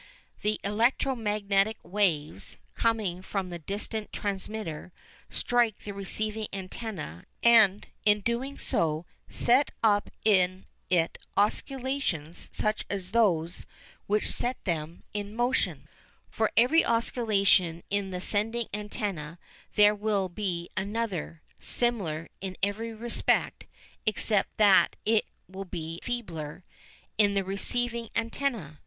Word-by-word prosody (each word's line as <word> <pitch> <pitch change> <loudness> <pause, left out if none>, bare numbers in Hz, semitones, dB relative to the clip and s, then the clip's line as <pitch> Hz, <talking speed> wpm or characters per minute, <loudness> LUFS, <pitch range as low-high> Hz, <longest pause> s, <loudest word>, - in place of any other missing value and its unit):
The 210 +1 0
electro 235 +6 +2
magnetic 210 -1 +1
waves, 165 - 0 0.2
coming 215 -6 0
from 190 -1 -3
the 175 - -5
distant 205 +5 -3
transmitter, 200 -4 -4 0.4
strike 240 -3 +1
the 205 - -5
receiving 215 +2 -2
antenna 190 - -6 0.2
and 220 -4 +6 0.2
in 210 -1 +5
so 205 - -13
doing 245 +5 -2 0.7
set 255 +4 +4
up 205 -2 +3 0.2
in 185 -3 +3 0.2
it 170 -2 +1 0.2
oscillations 215 - -1
such 215 0 -1
as 190 -2 -4
those 180 -7 +1 0.4
which 210 +1 +1
set 245 +1 -1
them 165 -2 -3
in 205 0 -4
motion. 245 +2 0 0.4
For 220 -1 +1
every 255 +8 +6
oscillation 200 -7 +2
in 200 -1 0
the 180 -1 -4
sending 225 +4 +1
antenna 205 -6 -4 0.4
there 210 0 +7
will 205 -2 0
be 175 -3 -3
another, 200 -5 -3 0.2
similar 185 -10 +1
in 190 -1 -5
every 215 +3 -1
respect 230 +1 0 0.4
except 215 -1 +2
that 205 -3 +6
it 220 0 +3 0.2
will 190 +1 -7
be 165 -3 -6
feebler, 175 -11 -5 0.6
in 205 -1 +4
the 195 - +2
receiving 235 +4 -1
antenna. 230 - -2
205 Hz, 115 wpm, -28 LUFS, 185-225 Hz, 0.7 s, there